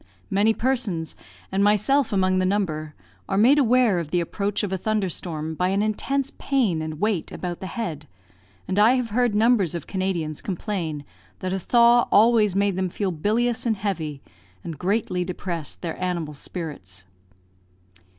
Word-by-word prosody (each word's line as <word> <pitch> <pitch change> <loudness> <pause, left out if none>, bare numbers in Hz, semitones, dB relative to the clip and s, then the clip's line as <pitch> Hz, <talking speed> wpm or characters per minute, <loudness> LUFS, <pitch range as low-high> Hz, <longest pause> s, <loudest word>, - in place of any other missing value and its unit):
Many 205 +3 +4
persons 230 -11 -1 0.4
(and 195 +1 +1
myself 210 +7 +3
among 185 -2 +2
the - - +1
number) 155 -7 -1 0.3
are - - 0
made 255 +8 +6
aware 245 -7 +4
of 165 -3 -5
the 175 - +1
approach 200 +4 -2
of 195 -2 -2
a - - 0
thunder 215 -1 0
storm 160 -2 -4
by 180 +3 0
an 200 +2 +1
intense 270 +6 -1
pain 230 - +1
and 155 -1 -5
weight 210 -4 -1
about 175 -1 -5
the 190 - -6
head; 165 - -5 0.6
and 190 +2 0
I 220 +4 +6
have 250 -3 -1
heard 240 -1 +2
numbers 215 -6 +3
of 170 - -5
Canadians 180 -6 -2
complain 170 -6 -4 0.3
that 185 0 -3
a 190 - -1
thaw 235 +4 +4
always 215 -3 +5
made 200 -1 +1
them 185 -1 0
feel 195 +1 -2
bilious 225 +9 0
and 225 - +2
heavy, 160 -8 -3 0.4
and 160 -4 -7
greatly 185 -1 0
depressed 175 -3 -4
their 170 +1 -4
animal 170 -4 -2
spirits. 140 - -7
190 Hz, 165 wpm, -24 LUFS, 170-220 Hz, 0.6 s, made